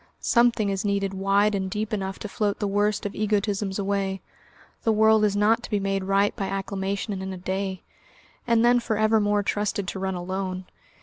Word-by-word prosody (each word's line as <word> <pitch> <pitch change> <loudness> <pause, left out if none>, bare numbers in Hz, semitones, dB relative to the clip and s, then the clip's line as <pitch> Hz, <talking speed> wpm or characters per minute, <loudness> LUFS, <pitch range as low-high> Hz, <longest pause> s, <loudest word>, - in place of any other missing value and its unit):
Something 235 -3 +3
is 195 0 -2
needed 200 -1 0
wide 200 +2 +2
and 190 -1 -1
deep 215 +3 -3
enough 195 -2 -2
to - - -6
float 205 0 -1
the 205 - -1
worst 205 +1 0
of 205 - -3
egotisms 205 -2 -1
away. 195 -1 -1 0.6
The 225 - +2
world 220 0 +4
is 205 -1 +2
not 215 +3 +3
to - - -8
be 210 - +1
made 195 -1 -1
right 195 +1 +2
by 195 -4 -3
acclamation 195 +1 -3
and 190 - -5
in 190 0 -4
a 190 - -6
day, 190 +1 -3 0.6
and 235 0 +4
then 245 0 +5
for 225 -2 -2
ever 215 +1 +3
more 205 0 +1
trusted 205 -1 -1
to 190 - -5
run 190 0 -2
alone. 185 +1 -4
200 Hz, 200 wpm, -25 LUFS, 195-210 Hz, 0.6 s, then